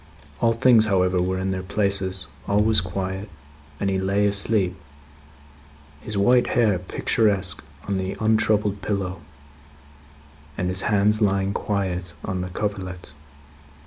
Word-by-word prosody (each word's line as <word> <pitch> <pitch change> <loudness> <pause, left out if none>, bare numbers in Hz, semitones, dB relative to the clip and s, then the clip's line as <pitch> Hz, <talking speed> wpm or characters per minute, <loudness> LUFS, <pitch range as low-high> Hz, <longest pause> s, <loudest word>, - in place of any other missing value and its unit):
All 115 -1 +3
things, 115 -1 +5
however, 90 -2 +2
were 95 +1 -1
in 95 +1 -2
their 95 0 -2
places; 95 0 -1 0.2
all 100 +1 +3
was 110 -2 +5
quiet; 95 +2 -4 0.5
and 100 - -1
he 95 -1 0
lay 100 +2 +1
asleep, 100 -2 +2 1.3
his 105 +3 -4
white 120 +5 +4
hair 105 -6 +3
picturesque 95 +1 +1 0.3
on 100 -1 -1
the 95 0 -4
untroubled 110 -2 +1
pillow, 95 -3 -3 1.4
and 90 - -1
his 95 +1 0
hands 105 +1 +2
lying 100 -1 +1
quiet 95 -5 -2
on 95 -1 -3
the 90 - -4
coverlet. 95 -3 -5
100 Hz, 130 wpm, -23 LUFS, 95-105 Hz, 1.4 s, things